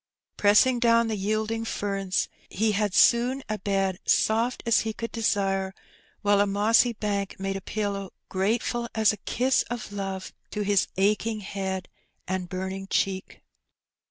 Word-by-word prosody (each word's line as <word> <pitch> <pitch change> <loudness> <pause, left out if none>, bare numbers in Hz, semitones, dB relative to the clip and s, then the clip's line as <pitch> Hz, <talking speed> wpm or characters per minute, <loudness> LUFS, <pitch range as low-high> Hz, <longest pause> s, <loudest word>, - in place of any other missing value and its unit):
Pressing 225 +5 +4
down 230 -1 +4
the 220 - -1
yielding 215 +3 -1
ferns, 195 -4 -1 0.2
he 215 +3 +1
had 205 -2 0
soon 250 +3 +4
a 215 0 -3
bed 195 -2 0
soft 230 +3 +2
as 230 -1 +4
he 220 -1 -2
could 230 +1 -5
desire, 195 -4 0 0.5
while 205 0 +4
a 205 - +2
mossy 220 +4 +3
bank 200 -3 -3
made 195 0 -2
a 195 - -4
pillow 200 -1 -3 0.2
grateful 230 +4 -1
as 220 -1 +4
a - - -7
kiss 255 +6 +1
of 240 -3 -5
love 195 -2 -5 0.2
to 210 - -3
his 200 -1 +2
aching 210 +2 +1
head 190 -2 -4 0.4
and 185 -1 -3
burning 190 +1 -4
cheek. 190 -1 -2
205 Hz, 150 wpm, -26 LUFS, 195-225 Hz, 0.5 s, Pressing